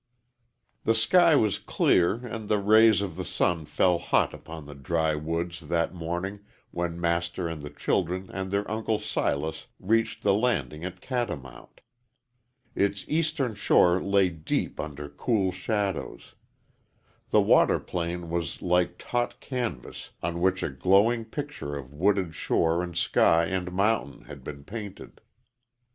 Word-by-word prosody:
THE 115 Hz, -, +2 dB
sky 170 Hz, +9 st, +5 dB
was 110 Hz, -7 st, +2 dB
clear, 90 Hz, +2 st, +2 dB
and 115 Hz, -3 st, -6 dB
the 105 Hz, -, +3 dB
rays 110 Hz, +1 st, +5 dB
of 90 Hz, -5 st, -5 dB
the -, -, -3 dB
sun 85 Hz, -3 st, 0 dB
fell 90 Hz, +2 st, +2 dB
hot -, -, +1 dB
upon 80 Hz, -2 st, -9 dB
the 75 Hz, -, -9 dB
dry 80 Hz, +3 st, 0 dB
woods 85 Hz, +2 st, -3 dB
that 85 Hz, +2 st, -1 dB
morning 90 Hz, +4 st, -4 dB, 0.3 s
when 85 Hz, -1 st, -3 dB
Master 85 Hz, +1 st, -1 dB
and 80 Hz, -2 st, -5 dB
the 75 Hz, -, -7 dB
children 90 Hz, +3 st, -1 dB
and 95 Hz, 0 st, -3 dB
their 100 Hz, +1 st, -1 dB
Uncle 110 Hz, 0 st, 0 dB
Silas 80 Hz, -5 st, -2 dB
reached 115 Hz, +3 st, 0 dB
the 100 Hz, -, +4 dB
landing 90 Hz, -, 0 dB
at 90 Hz, 0 st, -6 dB
Catamount. 110 Hz, -, -5 dB, 0.9 s
Its 100 Hz, 0 st, 0 dB
eastern 155 Hz, -6 st, 0 dB
shore 90 Hz, -3 st, +4 dB
lay 100 Hz, -1 st, +3 dB
deep 80 Hz, -3 st, -3 dB
under 75 Hz, -1 st, -5 dB
cool 95 Hz, -, 0 dB
shadows. 95 Hz, -, -3 dB, 1.0 s
The -, -, +5 dB
water -, -, +4 dB
plane 85 Hz, -1 st, -4 dB
was 85 Hz, -1 st, -2 dB
like 90 Hz, 0 st, +1 dB
taut 120 Hz, 0 st, -2 dB
canvas 120 Hz, -, -5 dB
on 85 Hz, +1 st, -2 dB
which 95 Hz, +1 st, +2 dB
a -, -, 0 dB
glowing 100 Hz, -, +3 dB
picture 140 Hz, -, -5 dB
of 70 Hz, 0 st, -9 dB
wooded 95 Hz, +1 st, +1 dB
shore 85 Hz, +2 st, +1 dB
and 85 Hz, -1 st, -5 dB
sky 85 Hz, 0 st, +3 dB
and 90 Hz, 0 st, -2 dB
mountain 100 Hz, -6 st, 0 dB
had 70 Hz, -3 st, -11 dB
been 70 Hz, 0 st, -8 dB
painted. 105 Hz, +2 st, -8 dB
90 Hz, 145 wpm, -27 LUFS, 80-105 Hz, 1.0 s, sky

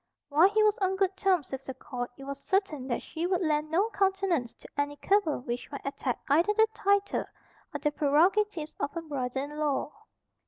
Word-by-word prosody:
While 315 Hz, +6 st, +6 dB
he 430 Hz, +1 st, +3 dB
was 425 Hz, -1 st, +3 dB
on 380 Hz, -1 st, +1 dB
good 380 Hz, 0 st, +1 dB
terms 370 Hz, -7 st, +1 dB
with 270 Hz, 0 st, -5 dB
the 265 Hz, -1 st, -6 dB
Court 245 Hz, -2 st, -5 dB
it 275 Hz, -, -10 dB
was 280 Hz, 0 st, -6 dB
certain 345 Hz, -9 st, 0 dB
that 240 Hz, -, -2 dB
she 335 Hz, +2 st, -3 dB
would 365 Hz, 0 st, +1 dB
lend 305 Hz, -1 st, +1 dB
no 390 Hz, +8 st, +1 dB
countenance 385 Hz, -, +1 dB
to -, -, -14 dB
any 290 Hz, 0 st, -1 dB
cabal 390 Hz, -4 st, +1 dB
which 245 Hz, -1 st, -4 dB
might 280 Hz, -, -7 dB
attack 275 Hz, -2 st, -2 dB
either 335 Hz, +9 st, +3 dB
the 440 Hz, +1 st, +6 dB
title 400 Hz, 0 st, +1 dB, 0.5 s
or -, -, -4 dB
the 295 Hz, -, +1 dB
prerogatives 315 Hz, +4 st, +2 dB
of 285 Hz, -, -2 dB
her 335 Hz, -, -3 dB
brother 265 Hz, -4 st, -3 dB
in 295 Hz, +2 st, -6 dB
law. 295 Hz, -1 st, 0 dB
310 Hz, 200 wpm, -29 LUFS, 280-390 Hz, 0.5 s, While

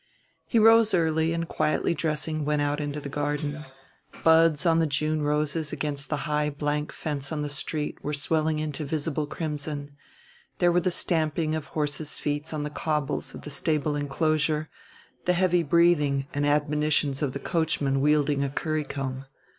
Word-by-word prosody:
He 235 Hz, -, +1 dB
rose 225 Hz, -1 st, +6 dB
early, 160 Hz, -1 st, +2 dB
and 165 Hz, 0 st, -2 dB
quietly 155 Hz, -, 0 dB
dressing 155 Hz, -1 st, -1 dB
went 150 Hz, 0 st, +1 dB
out 145 Hz, +1 st, 0 dB
into 145 Hz, 0 st, -3 dB
the 145 Hz, -, -7 dB
garden: 145 Hz, +1 st, -3 dB, 0.6 s
buds 160 Hz, -2 st, +5 dB
on 165 Hz, -1 st, +4 dB
the 165 Hz, -, +2 dB
June 155 Hz, +2 st, 0 dB
roses 150 Hz, +1 st, 0 dB
against 145 Hz, -1 st, -3 dB
the 150 Hz, -1 st, -2 dB
high 150 Hz, -1 st, 0 dB
blank 150 Hz, +1 st, -2 dB
fence 140 Hz, -2 st, -4 dB
on 150 Hz, -2 st, -2 dB
the 145 Hz, -, -3 dB
street 150 Hz, +1 st, -3 dB
were 150 Hz, -, -2 dB
swelling 155 Hz, +2 st, +1 dB
into 155 Hz, 0 st, -3 dB
visible 150 Hz, 0 st, -2 dB
crimson; 150 Hz, -2 st, -4 dB, 0.7 s
there 175 Hz, 0 st, +4 dB
were 175 Hz, +1 st, +3 dB
the 185 Hz, -, +1 dB
stamping 160 Hz, -2 st, 0 dB
of 155 Hz, -2 st, -3 dB
horses' 150 Hz, 0 st, -2 dB
feet 145 Hz, +1 st, -3 dB
on 155 Hz, -2 st, -3 dB
the 150 Hz, -, -4 dB
cobbles 150 Hz, -2 st, -2 dB
of -, -, -10 dB
the 150 Hz, -, -7 dB
stable 150 Hz, +1 st, 0 dB
inclosure, 155 Hz, +1 st, 0 dB, 0.5 s
the 180 Hz, -, +3 dB
heavy 180 Hz, -1 st, +3 dB
breathing 150 Hz, -4 st, +3 dB
and 145 Hz, 0 st, 0 dB
admonitions 150 Hz, -1 st, +1 dB
of 140 Hz, -4 st, -1 dB
the 140 Hz, -, -4 dB
coachman 145 Hz, -5 st, 0 dB
wielding 145 Hz, -1 st, +2 dB
a 140 Hz, -, -1 dB
currycomb. 140 Hz, -3 st, -3 dB
150 Hz, 165 wpm, -26 LUFS, 145-160 Hz, 0.7 s, rose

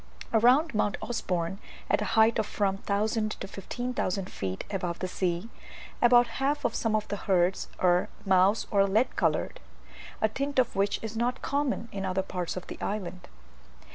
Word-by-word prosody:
Round 250 Hz, +7 st, +5 dB
Mount 210 Hz, -1 st, +1 dB
Usborne, 180 Hz, -5 st, -2 dB, 0.3 s
at -, -, +2 dB
a -, -, 0 dB
height 220 Hz, +1 st, +5 dB
of 210 Hz, -, 0 dB
from 195 Hz, -2 st, 0 dB
1000 215 Hz, +2 st, 0 dB
to -, -, -4 dB
1500 195 Hz, -2 st, -3 dB
feet 95 Hz, -1 st, -4 dB
above 180 Hz, -4 st, -2 dB
the 185 Hz, -, -3 dB
sea, 180 Hz, +1 st, -1 dB, 0.5 s
about 240 Hz, 0 st, +7 dB, 0.2 s
half 290 Hz, +2 st, +1 dB
of 235 Hz, -, +1 dB
some 225 Hz, -2 st, 0 dB
of 215 Hz, -1 st, -1 dB
the 205 Hz, -, -2 dB
herds 185 Hz, -2 st, +1 dB
are 180 Hz, 0 st, +3 dB, 0.2 s
mouse 190 Hz, +2 st, +4 dB
or 200 Hz, -2 st, +4 dB
lead 220 Hz, +6 st, +1 dB
coloured, -, -, 0 dB, 0.6 s
a 220 Hz, -, +3 dB
tint 275 Hz, +6 st, -3 dB, 0.2 s
which 200 Hz, +1 st, +1 dB
is 220 Hz, 0 st, -5 dB
not 245 Hz, +3 st, -1 dB
common 280 Hz, -5 st, -1 dB
in 195 Hz, -1 st, -4 dB
other 190 Hz, 0 st, 0 dB
parts 180 Hz, -2 st, -4 dB
of 185 Hz, -, -5 dB
the -, -, -9 dB
island. 190 Hz, -3 st, -4 dB
205 Hz, 170 wpm, -28 LUFS, 185-235 Hz, 0.6 s, about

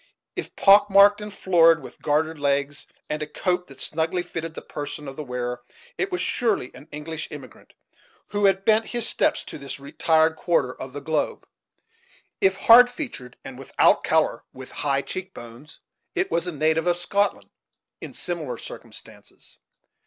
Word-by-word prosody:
If -, -, -6 dB
pock 205 Hz, +1 st, +6 dB
marked 200 Hz, +1 st, +6 dB
and 210 Hz, 0 st, -7 dB
florid, 165 Hz, -4 st, +4 dB
with 135 Hz, -, -13 dB
gartered 155 Hz, +1 st, 0 dB
legs, 140 Hz, 0 st, -1 dB, 0.2 s
and 150 Hz, 0 st, -3 dB
a 150 Hz, -, -3 dB
coat 180 Hz, +3 st, -1 dB
that 135 Hz, -1 st, -15 dB
snugly 165 Hz, +3 st, -2 dB
fitted 165 Hz, -2 st, -6 dB
the -, -, -6 dB
person 145 Hz, 0 st, -7 dB
of 135 Hz, -, -7 dB
the 150 Hz, -, -6 dB
wearer, 125 Hz, -2 st, -4 dB, 0.3 s
it 380 Hz, -3 st, -2 dB
was 360 Hz, -, -1 dB
surely 220 Hz, -, 0 dB
an 145 Hz, -, -14 dB
English 155 Hz, +2 st, -6 dB
emigrant, 140 Hz, -6 st, -12 dB, 0.6 s
who 205 Hz, 0 st, 0 dB
had 195 Hz, 0 st, +2 dB
bent 220 Hz, 0 st, +3 dB
his 235 Hz, -1 st, -1 dB
steps -, -, +1 dB
to -, -, -9 dB
this 140 Hz, 0 st, -7 dB
retired 160 Hz, +3 st, +2 dB
quarter 145 Hz, -7 st, +1 dB
of 130 Hz, 0 st, -9 dB
the 145 Hz, -, -6 dB
globe. 155 Hz, +1 st, -2 dB, 1.0 s
If 190 Hz, 0 st, +4 dB
hard 240 Hz, +5 st, +7 dB
featured 245 Hz, -, -7 dB
and 130 Hz, -1 st, -9 dB
without 135 Hz, -, +3 dB
color, -, -, +1 dB
with 130 Hz, 0 st, -11 dB
high 140 Hz, -1 st, -1 dB
cheek 190 Hz, 0 st, -6 dB
bones, 120 Hz, +6 st, -12 dB, 0.3 s
it 375 Hz, 0 st, -1 dB
was 170 Hz, +1 st, 0 dB
a -, -, -1 dB
native 160 Hz, +2 st, +1 dB
of 175 Hz, 0 st, +2 dB
Scotland, 200 Hz, +3 st, -1 dB, 0.5 s
in -, -, -9 dB
similar 155 Hz, -9 st, -3 dB
circumstances. -, -, -12 dB
160 Hz, 165 wpm, -24 LUFS, 140-195 Hz, 1.0 s, hard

